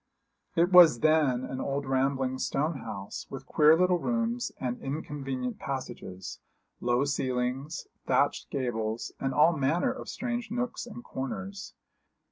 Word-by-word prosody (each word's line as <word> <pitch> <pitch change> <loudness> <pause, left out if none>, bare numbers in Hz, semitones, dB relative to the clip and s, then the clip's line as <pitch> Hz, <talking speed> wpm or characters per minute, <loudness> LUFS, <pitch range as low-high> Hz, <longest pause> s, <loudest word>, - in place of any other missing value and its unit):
It 170 +2 +3
was 165 -10 +8
then 150 -5 +3
an 130 0 -4
old 140 +1 -2
rambling 130 0 0
stone 150 +1 -1
house, 100 -4 -6
with 135 0 -7
queer 155 +2 +5
little 180 0 +3
rooms 235 +3 -1
and 125 -1 -3
inconvenient 135 -3 -4
passages, 95 -8 -6 0.4
low 120 +3 +2
ceilings, 130 +2 -2 0.2
thatched - - +2
gables, 115 -4 -2
and 135 - -1
all 150 +5 +5
manner 155 - +1
of 260 - -7
strange 240 -2 -3
nooks 245 0 -3
and 240 +1 -9
corners. 195 - -6
140 Hz, 130 wpm, -29 LUFS, 130-175 Hz, 0.4 s, was